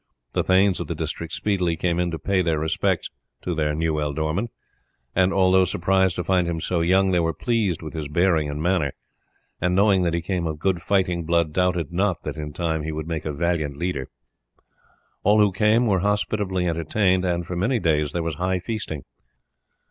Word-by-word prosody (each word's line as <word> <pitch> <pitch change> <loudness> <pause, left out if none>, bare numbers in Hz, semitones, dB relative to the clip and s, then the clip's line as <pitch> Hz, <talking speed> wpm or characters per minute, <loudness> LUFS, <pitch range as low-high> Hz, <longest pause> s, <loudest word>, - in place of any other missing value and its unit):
The - - +1
thanes 95 0 +3
of - - -4
the - - -3
district 85 -1 -4
speedily 90 -3 0
came 85 +1 0
in 90 0 +1
to 80 - -4
pay 95 +4 +1
their 85 -3 +1
respects 80 +1 0 0.3
to 90 - -2
their 75 -2 0
new 80 -1 0
ealdorman, 80 +8 -1 0.7
and 95 0 +3
although 95 -1 +4
surprised 95 +1 +1
to 90 - -2
find 90 -2 +2
him 85 -1 -2
so 85 +1 -1
young, 95 +3 +3
they 90 - +3
were 80 -1 0
pleased 110 -9 0
with 80 - -7
his 80 -3 -4
bearing 80 -1 +2
and 75 +1 -4
manner, 85 -6 +1 0.7
and 90 +1 +1
knowing 100 -1 +4
that 85 -2 +1
he 85 - -1
came 85 -2 -1
of 80 -1 -3
good 90 +2 0
fighting 90 -3 +1
blood 85 -1 +1
doubted 90 -2 0
not 95 -1 0
that 75 - -4
in 75 -1 -5
time 80 0 -2
he 80 +1 -4
would 80 0 -5
make 80 -2 -4
a 75 - -1
valiant 75 -2 -1
leader. 75 -6 -3 1.1
All 105 +1 +4
who 105 -2 +4
came 105 +5 +3
were 100 -4 +2
hospitably 100 -2 0
entertained, 90 +3 +1
and 85 -1 -1
for 90 - -5
many 115 +9 +1
days 75 -7 +1
there 85 +1 -2
was 80 -1 -2
high 95 0 +1
feasting. 90 - -5
85 Hz, 200 wpm, -23 LUFS, 80-95 Hz, 1.1 s, although